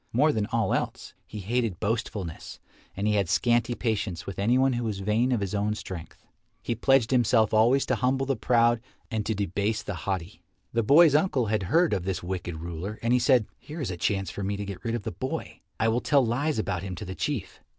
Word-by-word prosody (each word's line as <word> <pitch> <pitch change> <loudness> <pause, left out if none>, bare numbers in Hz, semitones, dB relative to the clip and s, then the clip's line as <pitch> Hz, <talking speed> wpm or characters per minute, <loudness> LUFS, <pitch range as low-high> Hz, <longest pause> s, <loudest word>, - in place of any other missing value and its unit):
More 145 +6 +4
than 105 -6 -1
all 115 -4 0
else, - - -3
he 105 - -7
hated 110 -2 -1
boastfulness 105 -5 -3 0.4
and 100 - -1
he 105 - +2
had 100 -5 +1
scanty 120 0 +2
patience 105 -7 -2
with 100 - -6
anyone 125 +6 +3
who 120 0 -2
was 110 -3 -2
vain 105 +6 +1
of 120 -4 +1
his 100 0 -3
own 105 +1 0
strength. 90 -5 -8 0.4
He - - -1
pledged 125 0 +3
himself 115 -3 +3
always 120 +5 +4
to - - 0
humble 130 +3 +1
the 135 0 0
proud 120 0 +3 0.3
and 110 -2 -1
to 110 - 0
debase 100 +2 -1
the 105 - -4 0.2
haughty. 95 +1 -3 0.3
The 115 - +2
boy's 145 +7 +6
uncle 145 -5 +2
had 110 0 0
heard 170 -4 +3
of 95 -3 -1
this 95 -2 -2
wicked 90 -2 -4
ruler, 85 +5 -5
and 115 +1 +2
he 125 - +4
said, 125 -3 +4
"Here 155 +3 -9
is 130 -9 -2
a - - -3
chance 95 +2 -1
for - - -6
me 100 +1 -2
to 100 - -4
get 100 -2 -7
rid 115 0 -1
of 115 - -4
the - - -3
boy. 130 +9 -5 0.2
I 110 - +2
will 115 +2 +1
tell 140 -4 +3
lies 140 +6 0
about 95 -4 -1
him 95 -2 -5
to 95 - -7
the 95 - -5
Chief." 140 +4 -3
110 Hz, 225 wpm, -27 LUFS, 100-125 Hz, 0.4 s, boy's